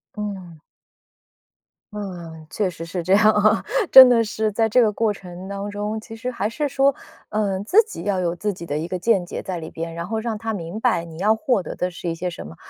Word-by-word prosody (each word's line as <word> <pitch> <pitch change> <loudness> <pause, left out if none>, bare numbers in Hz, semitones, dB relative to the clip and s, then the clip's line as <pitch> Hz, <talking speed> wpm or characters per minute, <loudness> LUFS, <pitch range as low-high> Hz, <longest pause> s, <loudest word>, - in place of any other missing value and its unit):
嗯。 190 -7 -6 1.3
嗯， 170 -6 -8
确 195 +2 -1
实 165 -1 -8
是 170 +1 -4
这 185 - -2
样 215 +2 +6
啊。 215 +1 +3 0.3
真 260 -1 +12
的 235 -2 +4
是 215 0 -1
在 220 +2 +1
这 250 - +4
个 215 -3 +2
过 220 0 +1
程 185 -1 -9
当 200 +1 -4
中， 210 +2 -3
其 225 +1 -10
实 245 +3 -4
还 210 -4 -2
是 290 +5 -2
说， 275 0 +2 0.3
嗯， 200 -3 -1
自 430 - +5
己 435 - -8
要 195 -3 0
有 170 -1 0
自 205 +4 -2
己 175 -2 -9
的 145 -2 -3
一 160 +2 -3
个 185 - -3
见 195 -1 +1
解 - - -6
在 185 -2 -4
里 160 - -7
边， 165 0 -6
然 170 +1 -5
后 220 - -2
让 220 -1 -3
她 225 0 -4
明 175 +1 -5
白 225 -8 +1
你 165 -1 -11
要 210 +5 +3
获 245 -6 0
得 - - -7
的 180 0 -2
是 170 0 -5
一 165 - -2
些 180 +2 -3
什 170 - -8
么。 80 - -11
200 Hz, 255 characters per minute, -22 LUFS, 175-220 Hz, 1.3 s, 真